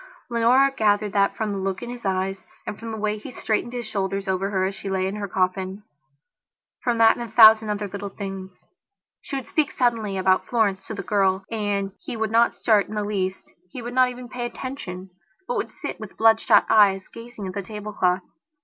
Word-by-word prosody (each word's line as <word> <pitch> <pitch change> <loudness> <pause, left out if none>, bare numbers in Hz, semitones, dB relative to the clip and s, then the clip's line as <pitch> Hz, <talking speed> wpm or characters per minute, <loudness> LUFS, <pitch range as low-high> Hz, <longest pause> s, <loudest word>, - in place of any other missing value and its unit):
Leonora 250 +4 +4
gathered 210 -2 +2
that 200 -1 +2
from 220 -2 -1
the 200 - -3
look 190 +3 -3
in 240 - -5
his 245 -4 -5
eyes, 190 0 -1 0.2
and 210 - -6
from 230 - -7
the 220 - -4
way 215 0 -1
he - - -9
straightened 225 -1 -2
his 245 -1 -4
shoulders 195 -1 -2
over 190 +1 0
her 190 -2 0
as 195 - -2
she 195 - -7
lay 190 -1 0
in 195 +2 -3
her 205 -1 -3
coffinfrom 190 +1 -1 1.0
that 230 -2 +5
and - - -7
a 235 - -5
thousand 220 -1 +8
other 210 0 -2
little 200 +1 -6
things. 190 -2 -8 0.6
She 275 - -6
would 270 - -3
speak 310 -6 +1
suddenly 225 -5 0
about 185 0 +2
Florence 205 -5 0
to 220 - -5
the 200 - -5
girl 195 -2 +1
and 205 -3 -1
he 235 - -6
would 220 -1 -1
not 230 +1 +4
start 210 -3 +3
in 215 - -7
the 210 - -1
least; 190 -2 -3 0.2
he 245 +5 -8
would 240 +1 -5
not 255 0 +4
even 250 0 -8
pay 240 0 -4
attention, 195 -8 -7 0.4
but 485 - -1
would - - -2
sit - - -7
with - - -10
bloodshot 225 0 +5
eyes 195 -3 +4
gazing 230 -3 -9
at 185 - -5
the 200 - -3
tablecloth. 200 -3 -1
210 Hz, 210 wpm, -24 LUFS, 195-230 Hz, 1.0 s, thousand